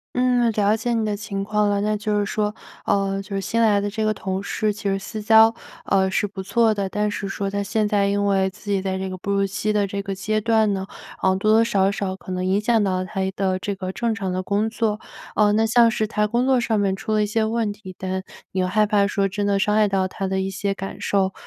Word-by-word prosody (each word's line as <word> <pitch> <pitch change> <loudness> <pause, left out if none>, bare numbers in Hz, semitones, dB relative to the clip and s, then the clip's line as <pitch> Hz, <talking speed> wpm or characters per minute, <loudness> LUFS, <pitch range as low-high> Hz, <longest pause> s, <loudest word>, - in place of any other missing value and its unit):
嗯， 245 -2 +2
了 210 +1 +2
解 235 +2 -2
你 225 -2 0
的 205 -1 -1
情 200 -1 -4
况 210 0 +1
了。 200 0 +1
那 210 +1 0
就 210 0 -1
是 205 - 0
说， 210 0 -1 0.3
哦， 195 -1 +1
就 195 +1 -8
是 195 - 0
新 230 +4 0
来 205 -2 +4
的 205 - -2
这 215 +1 -2
个 215 - +2
同 190 -1 -4
事 215 +1 -1
其 205 - -6
实 195 -1 0
私 215 +2 -6
交， 225 +1 +6 0.3
呃， 190 -1 +2
是 205 - +1
不 190 -1 -7
错 220 +3 +2
的， 200 -1 -2
但 210 0 0
是 200 -1 -4
说 195 0 -3
她 200 0 -2
现 210 +1 0
在 200 -1 +2
因 200 0 +1
为 190 -1 +2
自 205 +2 -9
己 195 -1 +1
在 190 -1 -2
这 190 0 -3
个 185 - -5
哺 200 +2 -5
乳 195 0 +2
期 210 +2 -2
的 205 -1 +1
这 200 +1 -4
个 195 0 -4
阶 215 +3 -1
段 220 -1 +2
呢， 190 0 -4 0.4
呃， 190 0 +3
多 215 +3 +1
多 225 +1 +5
少 195 -4 +2
少 195 -2 -3
可 190 - -11
能 185 0 -2
影 190 +2 +2
响 220 -1 +2
到 185 -1 0
她 190 +1 -3
一 190 - 0
的 190 -1 -1
这 200 +2 -3
个 185 -1 -5
正 230 +3 -1
常 195 -4 -3
的 185 +1 -2
工 205 +3 0
作。 220 -2 -1 0.3
呃， 210 -1 +4
那 220 +1 +3
像 230 +1 +5
是 220 -1 -1
她 210 0 0
工 240 +4 0
作 260 -2 +3
上 225 -3 0
面 195 -2 +1
出 215 +3 -4
了 210 - +3
一 - - +1
些 220 +1 0
问 225 -2 -1
题， 190 -3 -11
但 190 0 -3 0.3
又 185 -1 0
害 210 +3 +2
怕 205 -1 +2
说 200 -1 0
真 205 +1 -2
的 200 -1 +2
伤 210 +1 +1
害 210 -1 +4
到 190 -1 +1
她 190 +1 -4
的 190 0 -1
一 195 - -2
些 195 +1 -2
感 195 0 -7
受， 195 -1 +1
205 Hz, 290 characters per minute, -22 LUFS, 195-215 Hz, 0.4 s, 交